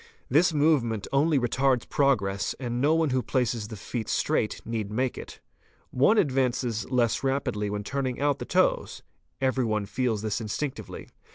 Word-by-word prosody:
This 160 +7 +4
movement 145 -9 +1
only 145 +2 +3
retards 130 0 +1
progress, 100 -9 +1
and 120 -2 -3
no 150 +3 +4
one 160 -3 +1
who 130 0 +1
places 120 -4 -1
the 110 - -8
feet 110 +3 -5
straight 105 - 0
need 110 -3 -3
make 125 +3 -1
it. - - -9 0.5
One 140 - +4
advances 130 - 0
less 125 -2 +1
rapidly 130 -6 -1
when 105 0 -3
turning 130 +1 -3
out 145 -1 +1
the - - -5
toes; - - +1 0.4
every 130 -1 +1
one 110 -3 -1
feels 115 -1 -1
this 110 +1 -2
instinctively. 130 +6 -5
125 Hz, 160 wpm, -27 LUFS, 110-140 Hz, 0.5 s, This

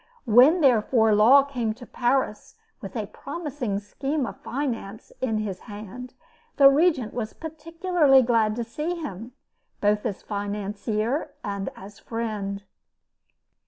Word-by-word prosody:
When, 260 +10 +6
therefore, 225 -4 +4
Law 240 +7 +7
came 245 -6 -3
to 245 +1 -11
Paris 245 -4 -1 0.3
with - - -8
a - - -2
promising 285 - -5
scheme 270 +8 -3
of - - -8
finance 235 -6 -4
in 225 -4 0
his 205 -4 -3
hand, 215 +5 -9 0.4
the 275 -1 +8
Regent 290 -6 +2
was 220 -3 -4
particularly 320 -3 +2
glad 225 -3 +2
to 240 - -2
see 300 +9 -3
him, 235 - -7 0.5
both 210 0 +2
as 200 -4 -6
financier 210 +5 -2
and 200 -2 -3
as 200 +2 -12
friend. 210 -4 -4
235 Hz, 125 wpm, -25 LUFS, 210-275 Hz, 0.5 s, the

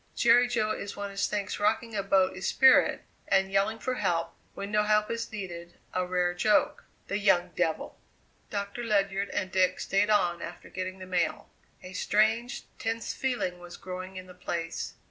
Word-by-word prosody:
Jerry 240 +1 +5
Jo 215 -3 0
is 205 -1 -4
one 200 0 -4
as 200 0 0
thinks 205 -1 -3
rocking 220 +2 0
a 200 - +1
boat 190 -1 +2
is 185 - -3
spirit, 265 -1 +5 0.2
and 195 0 +2
yelling 195 +3 +2
for 255 +3 -2
help, 175 -8 -1 0.2
when 200 +1 -5
no 210 0 +3
help 210 0 +2
is 230 0 -3
needed, 175 -5 -7 0.2
a 185 0 0
rare 180 -1 +1
joke. 215 +11 +2 0.2
The 200 - -1
young 180 -3 +3
devil!" 165 -3 -1 0.5
Doctor 200 +3 -4
Ledyard 200 -3 +1
and 185 0 -2
Dick 185 -1 +2
stayed 200 +2 +1
on 175 -5 +2
after 175 - -8
getting 185 0 -4
the 185 - -9
mail. 180 -2 -1 0.3
A 185 - -9
strange, 220 +5 +1 0.2
tense 225 0 -2
feeling 240 -9 -2
was 175 0 -10
growing 185 +1 -7
in 185 - -7
the 185 - -13
place. 170 -2 -4
195 Hz, 180 wpm, -29 LUFS, 185-215 Hz, 0.5 s, Jerry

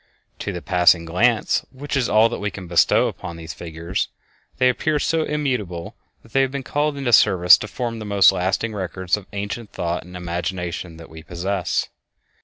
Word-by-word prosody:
To - - -3
the 85 -2 -6
passing 90 -2 +4
glance, 110 +8 +2
which 140 +2 -5
is 130 -3 +1
all 110 +1 +5
that - - -5
we 100 0 -2
can 95 -2 -9
bestow 85 -1 +3
upon 85 -1 -7
these 80 -2 -7
figures, 85 +4 -4 0.5
they 130 - +4
appear 150 +5 +1
so 160 +2 +1
immutable 125 - -3 0.3
that 115 - -19
they 135 - +4
have 135 - +2
been 140 0 -5
called 145 +2 -1
into 130 -4 -1
service 90 -3 +7
to 110 - -5
form 115 +1 -4
the - - -6
most 100 -2 +5
lasting 95 +5 -1
records 95 -2 -1
of 105 -3 -10
ancient 100 +2 -5
thought 85 0 -2
and 90 +1 -10
imagination 90 -1 -4
that 80 -1 -13
we 80 0 -10
possess. 90 +2 -2
95 Hz, 190 wpm, -22 LUFS, 85-120 Hz, 0.5 s, service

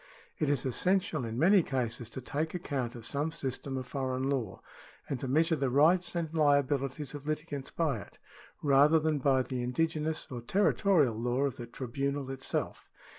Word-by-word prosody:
It 155 - +1
is 140 -3 +1
essential 180 +1 0
in 115 0 -4
many 190 +7 +6
cases 120 -5 -3
to 130 - -6
take 155 +7 -3
account 135 -8 -3
of 115 -2 -9
some 145 +5 -1
system 135 -2 -4
of 130 - -4
foreign 130 0 -2
law, 120 -9 -3 0.4
and 135 - -3
to 135 - -4
measure 160 +5 +3
the 135 -3 0
rights 170 +8 +3
and 165 -2 -2
liabilities 145 -2 +1
of 145 0 -8
litigants 155 -3 -3
by 150 -9 0
it, - - -13 0.5
rather 145 +2 +6
than 155 -1 +1
by 135 -1 +3
the 125 -1 -4
indigenous 155 +5 -1
or 125 -2 -5
territorial 185 - +3
law 120 +4 -1
of 140 -2 0
the 120 - -7
tribunal 135 +3 -3
itself. 135 0 -4
140 Hz, 175 wpm, -31 LUFS, 130-155 Hz, 0.5 s, many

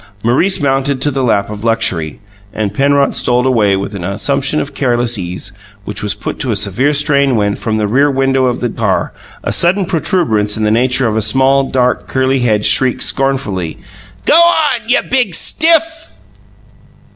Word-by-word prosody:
Maurice 135 - +2
mounted 135 -1 0
to 145 - +2
the 135 0 -2
lap 105 -5 0
of 105 0 -8
luxury, 115 -9 -1 0.3
and 105 -2 -3
Penrod 140 +3 +2
strolled 125 +1 +1
away 110 -6 +2
with 100 +2 -4
an 95 -3 -6
assumption 135 +10 0
of 140 - -5
careless 120 -2 -1
ease 90 0 -6 0.3
which 105 0 -6
was 105 -1 -2
put - - -6
to 130 - -3
a 110 - 0
severe 105 +8 0
strain 140 -2 +1
when, 105 -2 0
from 110 -2 -3
the 105 - 0
rear 140 +7 +2
window 135 -1 +1
of 125 -1 -1
the 120 - -1
car, - - -2 0.3
a - - -2
sudden 185 +3 +2
protuberance 150 - 0
in 110 - -2
the 105 - +1
nature 125 +2 +2
of 110 - -2
a 110 - +1
small, 135 +4 +2
dark, 125 -1 0
curly 130 0 0
head 110 -4 0
shrieked 130 -1 +2
scornfully: 120 -12 -2 0.5
"Go - - +3
on 305 -9 +1
you 270 +3 +2
big 245 -9 0
stiff!" 325 - +1
130 Hz, 180 wpm, -13 LUFS, 105-140 Hz, 0.5 s, Go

